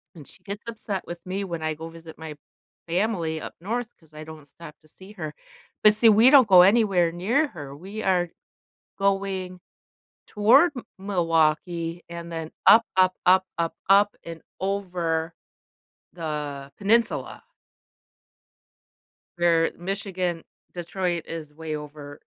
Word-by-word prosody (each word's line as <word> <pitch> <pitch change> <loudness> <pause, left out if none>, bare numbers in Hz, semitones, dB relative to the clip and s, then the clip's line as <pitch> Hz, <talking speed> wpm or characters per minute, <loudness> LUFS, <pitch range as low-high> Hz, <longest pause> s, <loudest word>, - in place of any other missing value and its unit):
and 150 -4 -13
she - - -16
gets 205 +1 -6
upset 215 -4 -5
with 175 - -6
me 190 +2 -3
when 170 -4 -5
I 155 0 -1
go 160 +2 -8
visit 165 -1 -13
my 160 -1 -7 0.5
family 170 -3 -1
up - - -8
north 225 +7 -3
because 160 -2 -26
I 155 0 -9
don't 155 -2 -12
stop 160 +1 -13
to 155 - -24
see 190 +6 -14
her. 155 -7 -6 0.5
But 215 - +8
see, 225 +1 +5
we 220 +4 +7
don't 265 -4 +7
go 185 -3 +8
anywhere 195 -4 +4
near 225 - +1
her. 145 - -9
We 195 +8 -8
are 180 -2 +1 0.7
going 195 -2 -1 0.7
toward 240 +11 +5
M 250 - -6
Milwaukee 165 -2 0
and 170 0 -8
then 160 -1 -5
up, 230 +1 +8
up, 185 0 +4
up, 185 +1 +5
up, 165 -1 -1
up 200 +1 +4
and 165 -1 -9 0.2
over 175 -4 -2 0.8
the 150 -4 -5
Peninsula 225 - 0 1.9
where 170 -1 +3
Michigan 185 -2 -3 0.3
Detroit 175 -1 -3
is 155 -3 -7
way 155 0 -5
over 150 -1 -9
175 Hz, 140 wpm, -25 LUFS, 160-200 Hz, 1.9 s, But